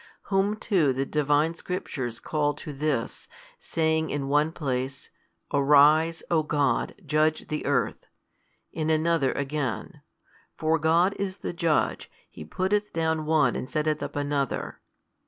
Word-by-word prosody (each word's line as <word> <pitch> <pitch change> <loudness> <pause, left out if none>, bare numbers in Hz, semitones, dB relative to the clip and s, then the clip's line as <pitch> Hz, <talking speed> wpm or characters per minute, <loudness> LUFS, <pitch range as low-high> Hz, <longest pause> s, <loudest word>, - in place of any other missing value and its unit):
Whom 195 +2 +2
too 180 - +1
the 135 +2 -1
Divine 150 +2 +1
Scriptures 135 -9 -4
call 145 -2 -1
to 150 - -8
this, 140 -4 -2 0.3
saying 160 -1 0
in 140 -1 -2
one 150 +2 +3
place, 135 -4 -4 0.4
Arise, 150 +3 +5
O 165 -2 +4
God, 150 -2 0
judge 155 +1 +1
the 150 - -2
earth, 140 -3 0 0.6
in 155 -1 -2
another 160 -3 +2
again, 140 -5 -3 0.6
For 160 +1 +1
God 165 +5 +3
is 195 -1 -3
the - - -2
Judge, 170 -3 0 0.2
He - - -9
putteth 195 - -1
down 160 -1 0
one 155 -2 +3
and 130 - -4
setteth 155 -1 0
up - - -5
another. 145 -1 -2
155 Hz, 135 wpm, -26 LUFS, 140-165 Hz, 0.6 s, Arise